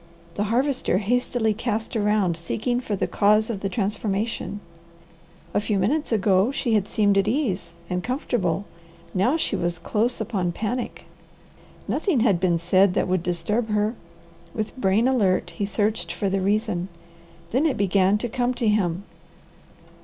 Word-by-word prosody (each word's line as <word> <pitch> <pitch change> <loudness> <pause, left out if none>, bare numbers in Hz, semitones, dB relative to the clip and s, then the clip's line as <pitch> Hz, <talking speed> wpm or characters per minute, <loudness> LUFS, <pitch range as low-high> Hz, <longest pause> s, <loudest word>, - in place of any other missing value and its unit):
The 205 - -1
Harvester 255 -2 +1
hastily 220 +1 +1
cast 225 +1 -3
around 210 -5 +2
seeking 220 +9 -2
for 215 -4 -2
the - - 0
cause 210 +2 +3
of 205 - -4
the 195 - -2
transformation. 205 0 -2 0.9
A 205 - +2
few 210 -1 0
minutes 260 +12 0
ago 200 -1 +3
she 245 -4 -1
had 210 -2 +2
seemed 205 -3 +3
at 195 - +1
ease 215 - -1
and 180 +1 -2
comfortable, 235 - -1 0.5
now 240 - +2
she - - -1
was 175 0 -1
close 220 +8 -1
open 195 -6 -1
panic. 235 +5 -4 0.8
Nothing 325 - +1
had 200 -7 +3
been 175 -2 +2
said 180 +3 +3
that - - +1
would 185 -1 +1
disturb 210 +6 -1
her. 210 +1 +1 0.6
With 215 -1 -3
brain 220 0 +2
alert 195 -9 +2
he 200 +4 -3
searched 205 -3 -1
for 190 +3 -2
the 195 0 0
reason. 200 -2 0 0.6
Then 275 +7 +3
it 285 - -1
began 195 0 +3
to 240 - -3
come 245 +1 -1
to 240 -2 -1
him. 195 -4 +1
210 Hz, 155 wpm, -24 LUFS, 190-235 Hz, 0.9 s, cause